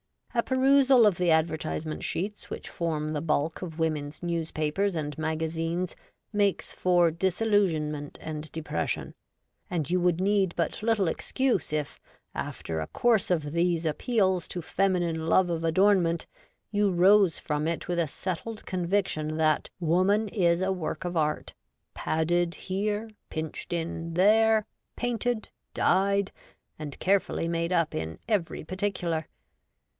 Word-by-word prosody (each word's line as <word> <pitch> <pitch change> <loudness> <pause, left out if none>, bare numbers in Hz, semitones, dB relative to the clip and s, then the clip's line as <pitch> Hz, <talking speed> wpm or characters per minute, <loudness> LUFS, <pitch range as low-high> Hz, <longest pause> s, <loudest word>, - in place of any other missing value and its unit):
A 235 - +3
perusal 260 -1 +5
of 200 -5 +3
the 180 -1 +1
advertisement 160 -1 0
sheets 205 +4 -3
which - - -6
form 155 -3 -2
the 150 -1 -2
bulk 155 0 0
of 165 -4 -6
women's 155 -1 -2
newspapers 170 +2 -1
and 150 -2 -3
maga 160 0 -1
zines 165 +2 -2 0.4
makes 205 -2 +1
for 175 -2 +3
disillusionment 170 -5 0
and 155 0 -6
depression; 155 - -3 0.6
and 165 -4 -2
you 180 - +3
would 175 -1 +2
need 195 -2 +2
but 170 - -1
little 220 -4 +2
excuse 260 - 0
if, 150 -2 -2 0.3
after 80 -1 -4
a 80 - -3
course 230 -5 +2
of 155 -5 0
these 170 0 +1
appeals 190 - +1
to 175 - -5
feminine 170 -3 0
love 180 +2 +4
of 165 -1 -2
adornment, 170 -1 +3 0.5
you 205 -1 +2
rose 190 0 +5
from 150 0 -2
it 165 0 -2
with 175 -1 0
a 165 - +2
settled 190 +8 -5
conviction 175 -4 -1
that 155 -1 +2
X^^oman 190 +6 +3
is 175 -4 +2
a 190 +1 +1
Work 170 -2 -3
of 175 0 -3
Art, 150 -1 -1 0.4
padded 170 +2 0
here, 205 +3 -2 0.2
pinched 160 0 -5
in 165 0 -3
there, 215 +4 +4 0.3
painted, 245 -2 -1 0.3
dyed, 200 +1 +2 0.5
and 150 -3 -6
carefully 190 -3 +1
made 170 +1 -1
up 165 -3 +1
in 80 0 -4
every 200 -7 0
par 185 +4 -7
ticular. 175 -6 -1
175 Hz, 140 wpm, -28 LUFS, 160-200 Hz, 0.6 s, perusal